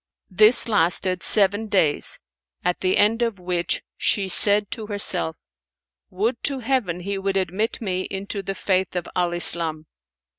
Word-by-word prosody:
This 215 +7 +6
lasted 185 -2 0
seven 205 +1 +2
days, 185 -8 0 0.5
at 180 - 0
the 185 0 +1
end 225 +3 +2
of 230 -4 -1
which 180 -1 -2
she 195 -2 -1
said 205 +2 +2
to 220 -3 -6
herself, 195 -5 +2 0.7
"Would 225 +6 -2
to 280 -1 -1
Heaven 220 -9 -2
he 200 +2 -4
would 195 0 -2
admit 190 +4 -2
me 185 -3 -3
into 200 +1 -5
the 195 0 -5
Faith 190 -1 -1
of 175 -1 -3
Al 175 -1 0
Islam!" 165 -2 +1
195 Hz, 150 wpm, -22 LUFS, 180-210 Hz, 0.7 s, This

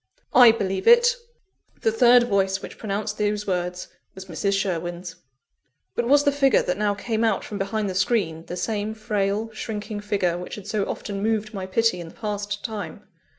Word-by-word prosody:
"I 245 -2 +9
believe 195 -4 -2
it!" 475 +1 +7 0.7
The 225 - +2
third 240 +2 +6
voice 195 -4 +1
which - - -9
pronounced 210 0 -3
those 210 0 0
words 180 -1 -2 0.3
was 190 0 -9
Mrs. 195 +3 -1
Sherwin's. 175 -2 -4 0.8
But 240 - -1
was 285 +2 +5
the 285 - +3
figure 275 -1 +3
that 180 +2 -2
now 205 -1 +1
came 220 +2 -2
out 220 -4 +1
from 205 - -6
behind 205 +2 -1
the 190 - -3
screen, 185 -4 0
the 180 - -5
same 215 +2 -2
frail, 215 0 -1
shrinking 215 -1 -5
figure 195 -4 -1
which 180 - -7
had 205 - -10
so 210 -1 -1
often 200 -1 -5
moved 215 0 -1
my 190 -2 -5
pity 225 -1 +1
in 170 - -7
the - - -17
past 205 -1 -4
time? 215 -3 -6
205 Hz, 185 wpm, -24 LUFS, 190-220 Hz, 0.8 s, I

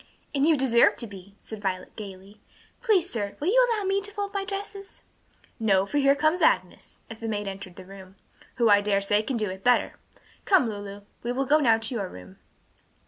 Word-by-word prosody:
"As 280 +1 +2
you 320 -2 +4
deserve 245 -3 +4
to 235 - -1
be," 200 -2 -12
said 220 -2 -10
Violet, 185 -2 -4
gayly. 200 0 -10 0.4
"Please, 410 -7 +2
sir, 205 - -4
will 310 - 0
you - - +5
allow 440 -3 0
me 390 +1 0
to 405 +1 -7
fold 405 -1 -4
my 395 -1 -1
dresses?" 395 0 -7 0.6
"No, 195 -4 +3
for 290 +8 -1
here 275 0 +4
comes 310 +5 +1
Agnes," - - 0
as 225 -1 -9
the 225 - -5
maid 205 -2 -3
entered 195 -2 -7
the 185 - -11
room, 190 0 -13 0.4
"who, 235 -2 +2
I 205 -1 +6
dare 200 -1 +1
say, 205 +1 +2
can 240 +3 -3
do 210 -4 -2
it 190 +1 -9
better. 245 0 +2 0.4
Come, 375 - +4
Lulu, 205 -1 -7 0.2
we 240 - -3
will 270 +2 -1
go 295 +4 +4
now 230 -6 +4
to 225 +3 -3
your 200 -6 -3
room." 90 +1 -13
225 Hz, 210 wpm, -26 LUFS, 200-310 Hz, 0.6 s, I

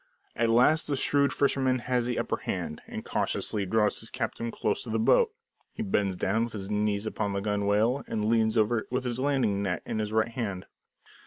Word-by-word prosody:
At 115 0 +1
last 125 +8 +4
the 145 - 0
shrewd 140 +1 +2
fisherman 135 -2 +2
has 125 -1 -1
the 125 - -1
upper - - -1
hand, 75 - -4
and - - -7
cautiously 100 -2 -1
draws 105 +1 +2
his 115 - -9
captive 115 -1 -3
close 105 - -1
up - - -4
to - - -7
the 110 - 0
boat. 440 - +4 0.4
He 225 - -4
bends 100 - 0
down, 110 +6 +1
with 120 - -9
his 100 -1 -6
knees 105 0 0
upon 105 -2 -2
the 100 - -1
gunwale, 105 +5 +1
and 105 -1 -2
leans 110 0 +2
over 110 +1 +2
with 125 +1 -1
the 125 0 -2
landing 130 -8 +1
net, 95 -3 -2
in 110 - -3
his 105 -1 -2
right 110 +1 +2
hand. 100 -6 -4
110 Hz, 210 wpm, -28 LUFS, 105-125 Hz, 0.4 s, last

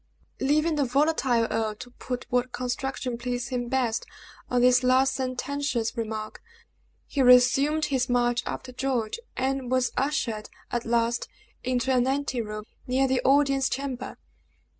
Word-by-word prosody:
Leaving 305 +3 +2
the 290 - +3
volatile 265 -3 +2
earl 220 -1 -1
to 245 +3 -10
put 250 0 -5
what 250 0 +1
construction 250 -1 -3
pleased 245 0 -3
him 245 -2 -2
best 245 -3 0 0.5
on 250 - +2
this 250 0 +5
last 260 +1 +3
sententious 260 -2 -2
remark, 220 -2 -4 0.6
he 280 - -1
resumed 265 +5 +5
his 265 -3 0
march 240 0 +2
after 260 - -5
George, 250 - -2 0.2
and 265 -1 -1
was 255 -1 +1
ushered, 240 -6 -1 0.2
at 240 -1 -2
last, 235 0 +1 0.4
into 255 +1 0
an 250 0 +3
ante 265 -2 -1
room 215 -1 -6 0.2
near 260 +2 +2
the 260 -1 +1
audience 275 -1 +3
chamber. 265 -2 -4
255 Hz, 140 wpm, -26 LUFS, 240-270 Hz, 0.6 s, this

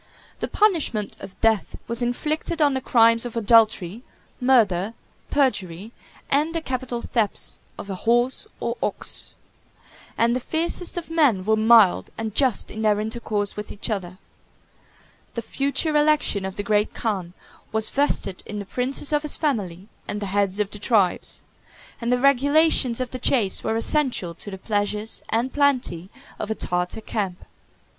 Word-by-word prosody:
The - - -2
punishment 325 - +1
of 190 - -11
death 220 -3 +1
was 235 +1 -1
inflicted 305 +7 -2
on 290 -2 +4
the 265 - -2
crimes 230 -2 +4
of 240 -1 -4
adultery, 220 -3 +3 0.4
murder, 225 -6 +3 0.3
perjury, 210 - 0 0.4
and 305 +4 +1
the 330 - 0
capital 255 -4 -4
thefts 220 -4 -1 0.2
of - - -8
a 195 - -4
horse 240 - +1
or - - -3
ox; - - -3 0.8
and 235 +1 +3
the - - 0
fiercest 335 +6 0
of 335 -1 -5
men 270 - +3
were 220 +1 +3
mild 220 -3 +5
and 220 -2 -4
just 260 -2 +1
in 220 - -6
their 210 -1 +2
intercourse 215 -2 -2
with 210 0 -6
each 205 - -5
other. 185 -3 -4 1.2
The 235 - -3
future 280 +5 -1
election 295 -9 +2
of 190 0 -5
the 205 - -3
great 210 0 +1
khan 190 -6 -2 0.4
was 220 0 +1
vested 270 -9 0
in 210 - -5
the 200 - -5
princes 255 +8 -1
of 295 - +3
his 300 -1 0
family 200 - -2 0.2
and 205 - -3
the 205 - -4
heads 200 -1 +1
of 205 -1 -1
the 210 - -9
tribes; 205 -4 +1 0.6
and 235 +1 -1
the 250 - +4
regulations 275 -1 +3
of 255 -1 -3
the 255 - -5
chase 230 -6 +1
were 220 - -1
essential 230 - +1
to 190 - -10
the 190 - -7
pleasures 210 +1 -2
and 240 +3 0
plenty 255 - +1 0.3
of 210 - -4
a 220 - -1
Tartar 180 +3 -2
camp. 195 -5 -4
225 Hz, 160 wpm, -23 LUFS, 205-265 Hz, 1.2 s, mild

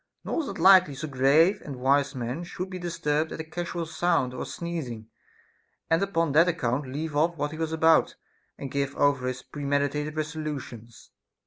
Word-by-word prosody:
Nor - - -1
is 295 - -5
it - - -6
likely 185 -3 +6
so 155 +4 -5
grave 150 +8 +3
and 140 - -7
wise 140 +2 +1
a - - -6
man 125 +7 -3
should 185 +2 -6
be 185 - -5
disturbed 160 -3 -1
at - - -6
a - - -3
casual 170 +1 -4
sound 160 -5 0
or 125 - -5
sneezing, 130 -11 -6 0.8
and 165 - +4
upon 165 -6 0
that 165 +5 +5
account 135 -5 -1
leave' 150 +2 -4
off 165 +3 +2
what 145 0 -2
he 155 - -7
was 160 -1 -2
about, 160 0 +3 0.4
and 135 - -7
give 140 0 -2
over 140 -3 +2
his 130 0 -4
premeditated 145 +1 -2
res 155 0 -3
olutions. 130 -7 -7
150 Hz, 190 wpm, -27 LUFS, 135-165 Hz, 0.8 s, likely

